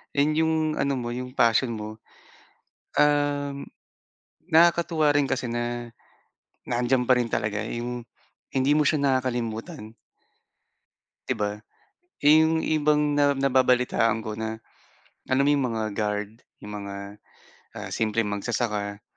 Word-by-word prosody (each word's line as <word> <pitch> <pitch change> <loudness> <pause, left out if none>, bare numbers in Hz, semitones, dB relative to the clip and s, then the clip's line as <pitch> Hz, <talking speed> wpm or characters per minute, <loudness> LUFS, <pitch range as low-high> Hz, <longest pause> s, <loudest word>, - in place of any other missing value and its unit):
And 145 +2 +3
'yung 160 0 +2 0.2
ano 140 0 +1
mo, 120 -2 -4
'yung 125 +1 -6
passion 115 0 +3
mo, 110 0 -7 1.0
um, 145 -1 +1 0.8
nakakatuwa 165 -2 +4
rin 145 -1 +2
kasi 130 -3 -2
na 120 0 -3 0.8
na 120 -1 -1
andiyan 125 0 +1
pa 130 - +6
rin 120 -2 -1
talaga 105 0 -1
'yung 120 +2 -4 0.5
hindi 135 +1 +1
mo 150 - +4
siya 150 +2 +2
nakakalimutan. 120 -5 -2 1.3
'Di - - 0
ba, 105 0 -2 0.6
'yung 160 +2 +5
ibang 150 -1 +1
na 145 -1 +4
nababalitaan 125 -4 +2
ko 110 -1 -6
na, 110 0 -4 0.7
alam 140 +2 +3
mo - - +5
'yung 140 -2 0
mga 110 -1 -2
guard, 105 -1 -2 0.3
'yung 105 0 -8
mga, 100 -1 -6 0.8
ah, - - -7
simpleng 110 -1 0
magsasaka. 105 -1 -2
125 Hz, 125 wpm, -25 LUFS, 110-145 Hz, 1.3 s, pa